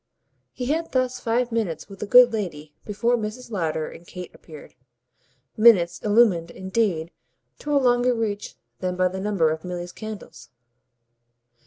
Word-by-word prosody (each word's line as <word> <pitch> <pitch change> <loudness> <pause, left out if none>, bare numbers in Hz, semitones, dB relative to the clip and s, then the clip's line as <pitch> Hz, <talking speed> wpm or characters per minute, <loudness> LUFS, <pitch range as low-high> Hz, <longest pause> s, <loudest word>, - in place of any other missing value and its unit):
He 250 - -5
had 320 +5 -2
thus 255 -1 0
five 235 +1 0
minutes 220 -8 -2
with 195 -1 -12
the 210 - -4
good 245 +2 +7
lady 155 -8 -4
before 220 +4 +1
Mrs. 235 +2 -5
Lowder 160 -5 -1
and 170 - -12
Kate 180 -1 -9
appeared 155 -3 -13 0.8
minutes 190 -7 +5
illumined 205 -6 +3
indeed 190 -4 -1 0.5
to 295 0 -2
a - - +6
longer 245 -1 +3
reach 210 -3 -3 0.2
than 180 -1 -2
by 185 0 +2
the 190 +1 -6
number 190 -6 +1
of 160 0 -4
Milly's 175 -1 -5
candles. 215 0 -9
210 Hz, 150 wpm, -24 LUFS, 175-235 Hz, 0.8 s, good